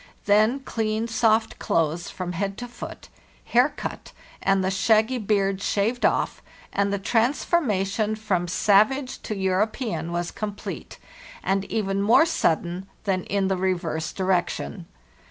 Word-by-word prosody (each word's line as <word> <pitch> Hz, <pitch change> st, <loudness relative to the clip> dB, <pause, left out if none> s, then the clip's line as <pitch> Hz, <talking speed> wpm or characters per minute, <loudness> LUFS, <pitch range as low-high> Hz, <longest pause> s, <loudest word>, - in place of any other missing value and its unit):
Then 215 Hz, +6 st, +4 dB
clean, 220 Hz, -3 st, -1 dB
soft 225 Hz, -1 st, +2 dB
clothes 165 Hz, +1 st, 0 dB
from 180 Hz, -1 st, -5 dB
head 195 Hz, +2 st, -3 dB
to 245 Hz, -, -5 dB
foot, 240 Hz, -, -9 dB, 0.4 s
hair -, -, +4 dB
cut, -, -, -7 dB, 0.3 s
and 195 Hz, -1 st, +2 dB
the 190 Hz, -, +1 dB
shaggy 220 Hz, +5 st, +3 dB
beard 195 Hz, -2 st, +1 dB
shaved 220 Hz, +5 st, +1 dB
off, -, -, -1 dB, 0.3 s
and 200 Hz, 0 st, +1 dB
the 200 Hz, -, 0 dB
transformation 220 Hz, -, +1 dB
from 195 Hz, -5 st, -1 dB
savage 215 Hz, +9 st, +2 dB
to 215 Hz, -, -4 dB
European 190 Hz, -, -1 dB
was 175 Hz, 0 st, -2 dB
complete, 205 Hz, -1 st, -6 dB, 0.5 s
and 195 Hz, 0 st, 0 dB
even 195 Hz, -2 st, -1 dB
more 225 Hz, +10 st, +6 dB
sudden 180 Hz, -, 0 dB, 0.2 s
than 190 Hz, -3 st, -1 dB
in 200 Hz, -1 st, 0 dB
the 190 Hz, -1 st, 0 dB
reverse 175 Hz, -4 st, -1 dB
direction. 185 Hz, -1 st, -1 dB
200 Hz, 135 wpm, -25 LUFS, 185-220 Hz, 0.5 s, more